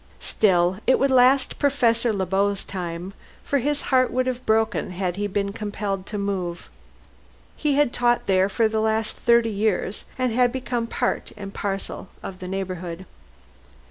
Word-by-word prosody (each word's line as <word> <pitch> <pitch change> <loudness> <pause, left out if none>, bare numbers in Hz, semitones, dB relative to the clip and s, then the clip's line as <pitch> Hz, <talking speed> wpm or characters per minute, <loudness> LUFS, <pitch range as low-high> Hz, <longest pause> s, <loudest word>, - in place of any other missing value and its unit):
Still 185 -2 +2
it 260 - +5
would 275 0 +2
last 260 +1 +4
Professor 240 -5 +2
Le 195 -3 -1
Beau's 195 +2 0
time, 180 0 -5 0.3
for 280 - +1
his 290 +3 0
heart 255 -1 +5
would 255 +1 +1
have 255 -1 -3
broken 220 0 +1
had 180 -1 -2
he 205 +1 -1
been 200 0 -2
compelled 205 -2 -4
to 210 - -4
move. 185 -4 -3 0.8
He 295 -2 0
had 290 -3 +3
taught 240 0 +2
here 190 0 +3
for 225 +3 +2
the 220 0 -1
last 220 0 0
thirty 235 -1 +3
years, 205 -1 -1
and 255 -3 0
had 245 0 +3
become 245 -2 -2
part - - -2
and 200 -1 -7
parcel 195 -1 -4
of 185 -1 -7
the 185 - -6
neighborhood. 185 -2 -4
210 Hz, 165 wpm, -24 LUFS, 190-245 Hz, 0.8 s, it